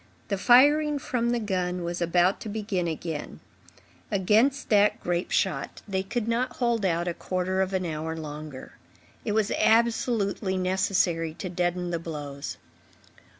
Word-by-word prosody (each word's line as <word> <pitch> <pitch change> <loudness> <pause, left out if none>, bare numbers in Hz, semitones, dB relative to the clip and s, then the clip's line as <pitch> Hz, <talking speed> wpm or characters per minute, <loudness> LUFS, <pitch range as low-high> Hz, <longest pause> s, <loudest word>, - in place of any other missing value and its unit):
The 200 - 0
firing 290 +6 +5
from 245 -3 -1
the 240 - +1
gun 180 -4 -2
was 175 +1 -3
about 175 +2 +2
to 220 - -6
begin 205 -4 -2
again. 160 -1 -5 0.7
Against 220 +8 +2
that 210 -2 +4
grape 175 +1 -2
shot, - - -1
they 190 -2 -1
could 225 +3 -3
not 235 +2 0
hold 235 -3 0
out 175 -2 +1
a 175 - 0
quarter 185 +2 -1
of 190 0 0
an 185 -1 -1
hour 160 0 -3
longer. 150 -3 -8 0.5
It 210 - -1
was 215 -1 +1
absolutely 225 -4 +2
necessary 185 -3 +1
to 185 - -5
deaden 175 0 -1
the 170 - -1
blows. 145 -4 -6
190 Hz, 150 wpm, -27 LUFS, 170-220 Hz, 0.7 s, firing